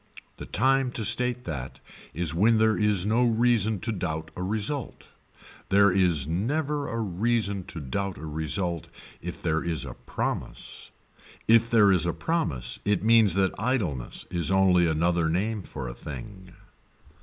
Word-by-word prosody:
The - - -8
time 135 +2 +2
to 110 - -2
state 125 +2 +2
that 70 - -6 0.3
is 85 +1 -1
when 110 +7 +4
there 110 0 +3
is 105 -4 +2
no 115 +4 +2
reason 115 -3 +2
to 115 - -2
doubt 80 -5 -4
a - - -6
result. 110 +8 -2 0.6
There 100 -1 +5
never 95 - 0
is - - -5
a 115 - -3
reason 100 -1 -1
to 80 - -7
doubt 95 +8 -3
a 80 - -8
result 80 +3 -2 0.3
if 85 0 -7
there 80 -1 0
is 80 -5 -1
a - - -7
promise. - - -5 0.6
If 115 0 +5
there 105 -4 +5
is 85 -3 +2
a 85 - 0
promise 160 - -2
it 105 -2 0
means 110 -3 +5
that 95 -1 +2
idleness 100 - -2
is 85 -1 0
only 95 -2 +4
another 85 +1 +1
name 105 +5 -1
for 70 -7 -7
a - - -6
thing. 90 +10 -9
95 Hz, 155 wpm, -26 LUFS, 85-115 Hz, 0.6 s, There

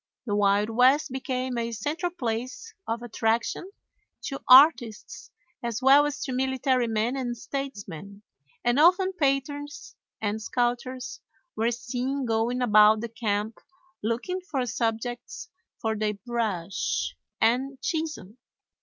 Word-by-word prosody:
The 210 - -2
Wild 205 +1 +2
West 260 +5 +4
became 255 -1 -2
a 235 0 -2
central 300 - -2
place 255 - -4
of 230 +1 -3
attraction 230 - -1 0.5
to 275 - -5
artists 255 -5 +5 0.3
as 235 -1 -3
well 275 +3 +6
as 295 0 -4
to 265 - -4
military 260 -1 +1
men 225 +3 0
and 245 -3 -3
statesmen, 200 - -7 0.4
and 240 +3 +3
often 370 +4 +5
painters 285 -2 -2 0.2
and 215 0 -2
sculptors 245 +2 -2 0.3
were 225 +2 +1
seen 250 +3 -3
going 235 +2 0
about 215 -1 +6
the 235 - -4
camp 215 -1 -2 0.4
looking 240 - -2
for 285 -9 -2
subjects 235 +1 -3 0.3
for 220 -1 -1
their 210 0 -1
brush 180 - -2 0.2
and 255 +4 +1
chisel. 310 - -4
240 Hz, 120 wpm, -26 LUFS, 220-270 Hz, 0.5 s, well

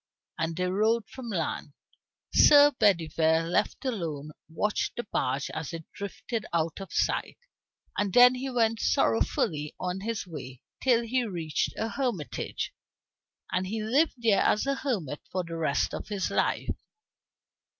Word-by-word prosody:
And 165 0 -1
they 180 +2 0
rowed 215 +4 +1
from 255 -3 -8
land. 165 -6 -3 0.6
Sir 290 0 +8
Bedivere, 165 - +2
left 210 +9 0
alone, 160 - -3 0.2
watched 210 +6 -1
the 240 - -3
barge 135 +1 -1
as 155 +1 -5
it 165 -1 -5
drifted 205 +2 -4
out 165 +2 -1
of 195 - -8
sight, - - 0 0.6
and 205 -1 0
then 245 +4 +8
he 260 +1 -4
went 230 -3 +1
sorrowfully 145 +6 +1
on 180 +1 -2
his 225 +1 -3
way, 130 -7 -9 0.2
till 240 -3 +3
he 250 +2 0
reached 170 -8 -2
a 225 - -1
hermitage. 235 - -3 0.8
And 185 +1 0
he 215 +2 -3
lived 275 +9 +2
there 225 -5 +3
as 210 - +2
a 275 - +1
hermit 220 - -3
for 185 -1 -1
the 165 -1 -6
rest 155 -4 0
of - - -5
his 205 -3 -2
life. - - 0
195 Hz, 150 wpm, -28 LUFS, 160-230 Hz, 0.8 s, Sir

